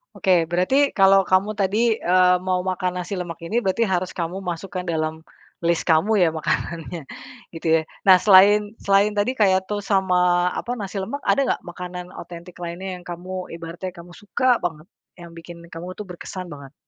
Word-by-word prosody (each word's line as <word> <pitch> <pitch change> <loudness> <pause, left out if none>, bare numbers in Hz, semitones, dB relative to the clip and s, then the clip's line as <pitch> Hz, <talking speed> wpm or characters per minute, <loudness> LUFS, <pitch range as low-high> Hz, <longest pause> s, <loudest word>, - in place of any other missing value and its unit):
Oke 190 - 0 0.2
berarti 180 +8 +1 0.2
kalau 195 0 +6
kamu 185 +2 +3
tadi, 195 +1 +1 0.3
eee, 180 0 +5
mau 185 -1 +1
makan 185 0 -1
nasi 180 +3 -6
lemak 175 -1 -6
ini 205 - -4
berarti 190 +4 0
harus 180 0 -1
kamu 170 +2 -3
masukkan 180 +1 -5
dalam, 160 -1 -3 0.4
list 170 -1 +1
kamu 160 +7 +3
ya 175 - +5
makanannya 165 +2 -3 0.6
gitu 165 - -5
ya - - -2 0.2
nah 190 -2 +8
selain 205 +2 +5
selain 200 +1 +3
tadi 205 +5 +2
kayak 190 -2 +4
toast 205 +1 -5
sama 180 -1 +2
apa 240 - -5
nasi 200 -1 -4
lemak 235 +10 -5
ada - - +2
nggak - - -1
makanan 180 0 -7
otentik 175 +1 -11
lainnya 175 +3 -6
yang - - -16
kamu 180 +1 -6
ibaratnya 170 +2 -6
kamu 170 +1 -12
suka 210 +6 -3 0.2
banget? 160 -3 -3 0.4
Yang 170 0 -10
bikin 170 +1 -11 0.2
kamu 165 +2 -7
tuh 210 - -5
berkesan 180 +1 -7
banget? 140 -1 -12
180 Hz, 175 wpm, -22 LUFS, 170-195 Hz, 0.6 s, nah